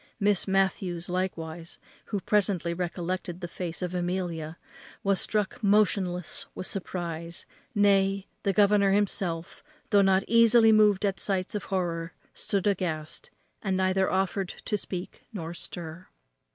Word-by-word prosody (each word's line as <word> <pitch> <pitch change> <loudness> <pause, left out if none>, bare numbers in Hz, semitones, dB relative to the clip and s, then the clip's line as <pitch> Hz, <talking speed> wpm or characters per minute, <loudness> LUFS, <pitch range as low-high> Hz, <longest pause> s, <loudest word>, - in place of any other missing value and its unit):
Miss 205 -2 +2
Matthews 190 -3 0
likewise, 170 -2 -3 0.3
who 205 -3 -3
presently 190 -5 +1
recollected 175 0 -3
the 175 - -4
face 170 0 -5
of 180 0 -3
Amelia, 175 -3 -2 0.5
was 195 -2 +2
struck 210 -3 -1
motionless 195 -4 +1
with - - -5
the - - -2
surprize, 170 -3 -4 0.3
nay, 195 -1 +3 0.2
the 200 - +1
governor 200 0 +4
himself, 190 -5 -1 0.3
though 205 -2 +6
not 195 0 +4
easily 230 0 +6
moved 210 -2 +5
at 195 -1 0
sights 190 -2 -1
of 210 - -3
horror, 170 -3 -2 0.2
stood 200 -2 -1
aghast, 170 -6 -1 0.3
and 190 -2 0
neither 190 0 +2
offered 190 0 0
to 210 - -3
speak 185 -2 -5
nor 170 -4 -5
stir. 170 0 -7
185 Hz, 135 wpm, -28 LUFS, 175-200 Hz, 0.5 s, though